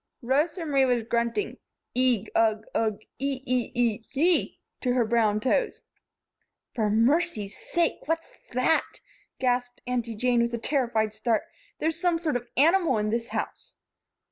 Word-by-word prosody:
Rosa 305 +7 +1
Marie 275 -3 +3
was 245 -3 +1
grunting. 235 - -1 0.4
"Eigh, 250 -4 +2
ugh, 220 -1 +2
ugh, 220 -2 0 0.2
ee, 270 -1 -2
ee, 250 -1 0
ee, 235 -2 +1
hee!" 330 +6 +2 0.2
to 250 -2 +1
her 250 - +2
own - - +4
bare 220 - -5
brown 220 -3 +3
toes. 425 - 0 0.9
"For 215 -3 0
mercy's 230 - +1
sake! 340 -4 -1
What's 325 +1 -2 0.2
that?" 255 +6 +1 0.4
gasped 245 -1 0
Aunty 240 -2 -2
Jane, 245 +2 +2
with 235 0 0
a - - -2
terrified 235 -4 0
start. 220 0 0 0.3
"There's 320 +2 -1
some 350 -2 +2
sort 325 -5 -1
of 245 - 0 0.2
an 270 - +6
animal 335 -6 +3
in 210 0 0
this 230 0 -1
house." - - -5
245 Hz, 160 wpm, -27 LUFS, 225-295 Hz, 0.9 s, an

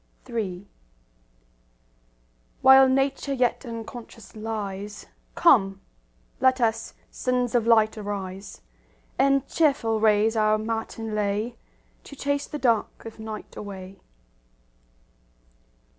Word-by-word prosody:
III 205 -6 -4 1.9
While 265 0 +8
Nature 275 +1 0
yet 250 -1 0
unconscious 230 -1 -9
lies, 210 -2 -5 0.3
Come, 195 - +4 0.6
let 260 0 +3
us, 225 -1 -1 0.2
sons 250 -1 -1
of 235 -2 +2
light, 220 -1 +4
arise, 195 - -6 0.6
And 275 -1 +3
cheerful 270 -9 +1
raise 215 +1 +3
our 215 -1 +3
matin 225 0 -4
lay 210 +3 -1 0.5
To 280 - -11
chase 285 +1 -1
the 300 - -5
dark 235 -6 0
of 225 -1 -9
night 220 -1 -8
away. 195 -2 -8
225 Hz, 100 wpm, -25 LUFS, 210-250 Hz, 1.9 s, While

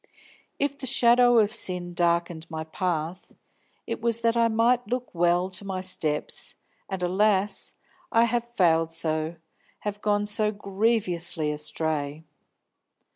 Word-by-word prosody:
If 280 0 -1
the 265 - -4
shadow 245 -1 +5
of 215 -1 +3
sin 180 -5 -1
darkened 170 -1 0
my 160 -1 -4
path, 170 +1 -3 0.5
it - - -4
was 230 0 +1
that 230 0 +2
I 230 0 +4
might 235 +2 +2
look 250 0 -3
well 175 +1 +2
to 185 +2 -7
my 190 -2 -4
steps, 155 -5 -2 0.3
and, 190 -2 -4
alas, 200 +2 +1 0.4
I 230 - +5
have 235 0 +1
failed 165 -3 +3
so, 160 0 -2 0.5
have 205 0 -4
gone 205 -1 +1
so 210 +1 +1
grievously 190 -6 +1
astray! 150 0 -2
190 Hz, 130 wpm, -26 LUFS, 165-230 Hz, 0.5 s, shadow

